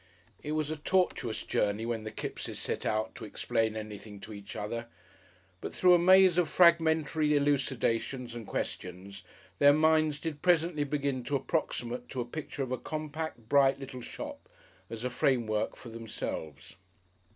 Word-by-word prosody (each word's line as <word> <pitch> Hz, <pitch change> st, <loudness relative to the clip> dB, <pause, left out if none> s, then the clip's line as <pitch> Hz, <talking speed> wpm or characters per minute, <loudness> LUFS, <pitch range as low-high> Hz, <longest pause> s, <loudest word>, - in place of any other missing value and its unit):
It 150 Hz, -, -3 dB
was 155 Hz, -1 st, -1 dB
a 155 Hz, -, -3 dB
tortuous 155 Hz, -8 st, 0 dB
journey 105 Hz, +2 st, 0 dB
when 115 Hz, -2 st, -3 dB
the 110 Hz, -, -4 dB
Kippses -, -, -5 dB
set -, -, -3 dB
out 110 Hz, 0 st, 0 dB
to -, -, -10 dB
explain 110 Hz, +1 st, -1 dB
anything 105 Hz, -1 st, -7 dB
to 110 Hz, -, -8 dB
each 100 Hz, -1 st, -9 dB
other. 115 Hz, +3 st, -4 dB, 0.7 s
But -, -, -6 dB
through 180 Hz, -1 st, +6 dB
a 175 Hz, -, +6 dB
maze 185 Hz, 0 st, +6 dB
of 170 Hz, -4 st, +2 dB
fragmentary 160 Hz, -3 st, +4 dB
elucidations 130 Hz, -3 st, 0 dB
and 115 Hz, -3 st, -7 dB
questions, 95 Hz, +2 st, -5 dB, 0.4 s
their 145 Hz, 0 st, +7 dB
minds 155 Hz, -1 st, +3 dB
did 155 Hz, -3 st, -5 dB
presently 165 Hz, -4 st, +2 dB
begin 140 Hz, -3 st, -1 dB
to 145 Hz, -, -1 dB
approximate 125 Hz, -4 st, -2 dB
to 130 Hz, -, -5 dB
a -, -, -3 dB
picture 145 Hz, +2 st, -5 dB
of 130 Hz, -, -5 dB
a 130 Hz, -, -1 dB
compact, 155 Hz, -5 st, -5 dB
bright, 140 Hz, +1 st, +4 dB
little 130 Hz, -2 st, -7 dB
shop, -, -, -8 dB, 0.4 s
as 115 Hz, 0 st, -6 dB
a 125 Hz, -, -1 dB
framework 115 Hz, -5 st, +1 dB
for 120 Hz, -, -11 dB
themselves. 110 Hz, -10 st, -6 dB
135 Hz, 160 wpm, -30 LUFS, 115-155 Hz, 0.7 s, their